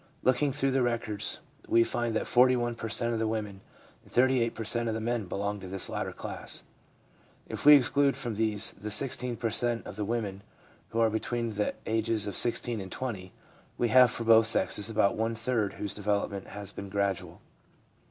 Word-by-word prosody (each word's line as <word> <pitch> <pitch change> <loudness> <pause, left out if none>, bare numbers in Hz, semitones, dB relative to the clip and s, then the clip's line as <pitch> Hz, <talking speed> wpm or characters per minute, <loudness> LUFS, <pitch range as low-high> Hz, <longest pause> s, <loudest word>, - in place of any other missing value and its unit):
Looking 130 +3 +2
through 135 0 0
the 130 0 +2
records 115 -4 -2 0.3
we 115 - +4
find 120 -1 -2
that - - 0
41 125 -1 +3
per 115 -1 -6
cent, 115 +1 +1
of 115 - -1
the 110 - 0
women 105 -3 -4 0.4
and - - -21
38 125 -2 +2
per 115 - -4
cent, 115 +2 0
of 110 - -2
the - - -2
men 115 -2 -2
belong 100 +2 -3
to 95 - -9
this 95 0 0
latter - - -3
class. - - -5 0.8
If - - -6
we 150 - +11
exclude 140 0 +3
from 120 -4 -4
these 110 0 0
the 105 +2 -7
16 125 +2 -1
per 115 -2 -2
cent, 120 +1 0
of 105 - -8
the 105 - -2
women 105 -3 -3 0.5
who 115 - -2
are 115 -1 +3
between 115 +1 -2
the 105 0 -1
ages 110 -1 0
of 100 - -4
16 120 -2 +1
and 95 -1 -8
20, 100 -8 -5 0.5
we 120 - +1
have 125 +1 +7
for 120 - -3
both 115 -1 +6
sexes 105 -1 +2
about 105 -3 +2
one 115 +1 -1
third 115 -3 -1
whose 105 - -3
development 100 -1 -2
has 100 -1 -6
been 100 -1 -8
gradual. 100 -1 -2
115 Hz, 195 wpm, -29 LUFS, 105-120 Hz, 0.8 s, we